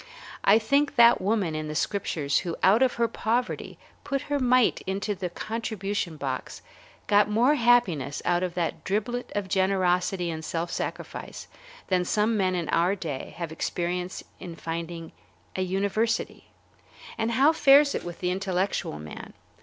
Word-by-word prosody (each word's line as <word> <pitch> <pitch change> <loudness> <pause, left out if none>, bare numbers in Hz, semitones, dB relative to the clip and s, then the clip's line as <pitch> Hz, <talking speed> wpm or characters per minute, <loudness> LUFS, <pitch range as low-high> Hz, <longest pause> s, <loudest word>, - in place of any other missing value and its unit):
I 200 +2 +6
think 280 +6 +1
that 235 0 +7
the - - -8
woman 200 -5 +1
in 155 0 -3
the 150 - -5
Scriptures 155 -7 0
who 170 -3 -4
out 205 +6 +5
of 260 -2 +3
her 235 0 +2
poverty 230 +2 -2 0.3
put 275 -1 -2
her 285 - +2
mite 255 -2 +3
into 200 +2 -1
the 180 -2 -4
contribution 205 -4 -3
box 135 -3 -5 0.4
got 205 0 +4
more 235 +7 +4
happiness 235 - +2
out 175 0 +2
of 180 -1 -3
that 170 -2 -2
driblet 230 +5 -2
of 205 -2 -1
generosity 185 -2 +1
and 160 0 -6
self 165 +2 -3
sacrifice - - -5 0.4
than 185 -2 +2
some 215 +4 +1
men 185 -3 +1
in 170 -3 -2
our 175 +4 +2
day 155 -8 -6
have 170 -2 -4
experienced 180 +2 -3 0.2
in 175 -3 -8
founding 165 0 -5 0.4
a - - -1
university. 200 +4 -1 0.7
And 225 +1 -1
how 275 +6 +5
fares 280 -1 +6
it - - -3
with 175 -1 -8
the 180 0 0
intellectual 190 - -1
man? 75 0 -9
190 Hz, 160 wpm, -26 LUFS, 175-225 Hz, 0.7 s, that